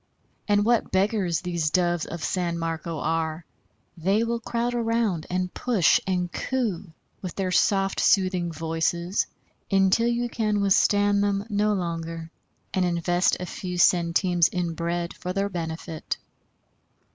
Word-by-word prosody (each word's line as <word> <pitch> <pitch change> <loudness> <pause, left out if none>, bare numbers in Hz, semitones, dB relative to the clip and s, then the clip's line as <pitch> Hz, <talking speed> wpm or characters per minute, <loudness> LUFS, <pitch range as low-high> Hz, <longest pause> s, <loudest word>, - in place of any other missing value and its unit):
And 205 -1 +3
what 235 0 +2
beggars 190 -3 +1
these 170 -4 -1
Doves 175 0 +1
of 170 -2 -6
San 175 -2 -1
Marco 165 0 -3
are! 160 +1 -2 0.5
They 195 +6 +1
will 235 0 -1
crowd 235 +1 -2
around, 230 -8 0
and 180 0 -2
push 225 -9 +3
and 180 -2 0
coo 210 -9 -2 0.3
with 185 -3 -6
their 190 -2 -1
soft 195 +1 +2
soothing 185 -3 +2
voices, 165 +3 -1 0.4
until 195 +4 +3
you 240 0 0
can 215 -3 0
withstand 205 +1 +3
them 200 0 0
no 210 +1 +2
longer, 165 -3 -4 0.4
and 185 - +2
invest 175 +1 +1
a 180 - -4
few 180 -1 -5
centimes 175 0 +3
in 175 -2 -2
bread 170 +1 -2
for 180 0 -5
their 200 +1 0
benefit. 165 -2 -4
180 Hz, 135 wpm, -25 LUFS, 170-205 Hz, 0.5 s, And